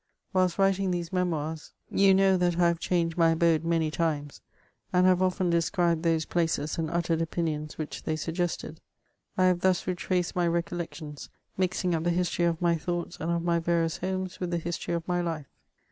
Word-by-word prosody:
Whilst 185 -2 +2
writing 195 -1 +2
these 175 -1 -3
Memoirs, 160 -4 -2 0.2
you 195 0 +5
know 195 0 +4
tbat 175 -2 +1
I 175 -1 +4
h&ve 170 - -4
changed 170 -1 0
my 165 -1 +6
abode 165 -1 +2
many 165 -2 +1
times, 150 -3 -2 0.5
and 180 0 +4
have 185 -1 +4
often 185 -1 +1
described 170 0 +1
those 165 -2 +1
places, 160 -3 -1
and 160 -1 -1
uttered 170 -1 0
opinions 160 -2 -2
which 155 -1 -5
they 155 - -2
suggested; 165 0 -3 0.6
I 185 - +4
have 180 -1 +3
thus 185 -1 +2
retraced 180 -1 -1
my 175 -1 +2
recollections, 170 -3 -4 0.3
mixing 180 -1 0
up 160 -1 0
the 175 - +1
history 175 0 +1
of 165 -1 0
my 170 -1 +2
thoughts 175 +1 -4
and 165 - -3
of 170 0 0
my 170 -1 +2
yarious 165 -1 0
homes 185 0 -3
with 180 - -2
the 170 - 0
history 170 +1 -3
of 165 -1 -4
my 175 -1 +1
life. 165 -4 -3
170 Hz, 190 wpm, -28 LUFS, 165-180 Hz, 0.6 s, my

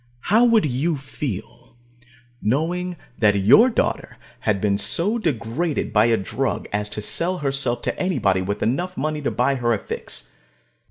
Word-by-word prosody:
How 225 +2 +6
would 230 -6 +4
you 145 +4 0
feel, 120 -5 -7 0.7
knowing 175 +9 -1 0.2
that 105 -3 +4
your 115 - +6
daughter 230 - -2 0.2
had 105 -2 0
been 100 0 +1
so 175 - +2
degraded 150 - -2
by 105 +1 +5
a 115 -1 +3
drug 95 - -2
as 105 0 -1
to 105 - -5
sell 180 - 0
herself 135 -5 -1
to - - -1
anybody 100 - +1
with 100 +2 -3
enough 175 +10 -1
money 155 0 -2
to 145 - 0
buy 125 +5 +1
her 120 -3 +1
a - - -2
fix? - - -5
135 Hz, 160 wpm, -22 LUFS, 105-170 Hz, 0.7 s, How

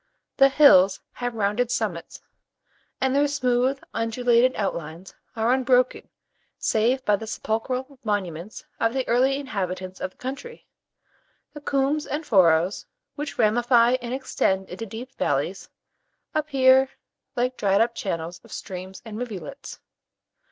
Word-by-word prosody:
The 275 0 +7
hills 200 -10 +6
have 245 -1 -4
rounded 215 +3 0
summits, 205 -9 -3 0.8
and 265 0 +1
their 290 +1 +4
smooth, 260 -1 +1
undulated 235 +2 +2
outlines 170 -3 -4 0.2
are 225 +2 +2
unbroken 255 -1 +2 0.5
save 245 +4 +1
by 205 -1 +3
the 220 - -8
sepulchral 255 +5 -3
monuments 195 -3 -3
of 230 +2 +1
the 260 -1 -1
early 260 +3 +3
inhabitants 185 -8 -4
of - - -2
the - - -32
country. 275 - -7 0.9
The 295 - -9
coombes 285 +2 0
and 300 +3 -3
furrows, 180 - +3 0.3
which 295 0 -6
ramify 240 +2 +4
and 240 0 -5
extend 190 -7 -1
into 225 +5 -6
deep 240 +6 -8
valleys, - - -1 0.6
appear 270 -4 +4 0.5
like 250 +1 0
dried 200 -3 +2
up 230 +1 +2
channels 170 -5 -4
of 230 - -17
streams 185 -1 -7
and 220 -1 -7
rivulets. 245 +3 -7
235 Hz, 130 wpm, -24 LUFS, 200-265 Hz, 0.9 s, The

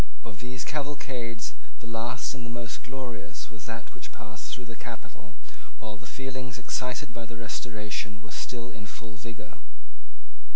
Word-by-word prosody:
Of 105 -3 -3
these 125 +1 +1
cavalcades 130 -6 +2 0.2
the - - -8
last 115 +3 +3
and 130 -3 -2
the 120 - 0
most 120 -3 +1
glorious 125 -3 -1
was 110 -1 -5
that 115 0 -1
which 125 - -5
passed 110 -3 -4
through 125 - +1
the 115 0 -3
capital 115 -3 -5 0.4
while 110 -2 -1
the 105 -1 -7
feelings 130 -2 0
excited 125 +2 +3
by 115 -1 -1
the 115 0 -3
Restoration 105 -2 +2
were 110 -1 -8
still 120 -1 +1
in 105 -1 -4
full 110 +1 -4
vigour. 105 0 -4
115 Hz, 160 wpm, -35 LUFS, 110-125 Hz, 0.4 s, last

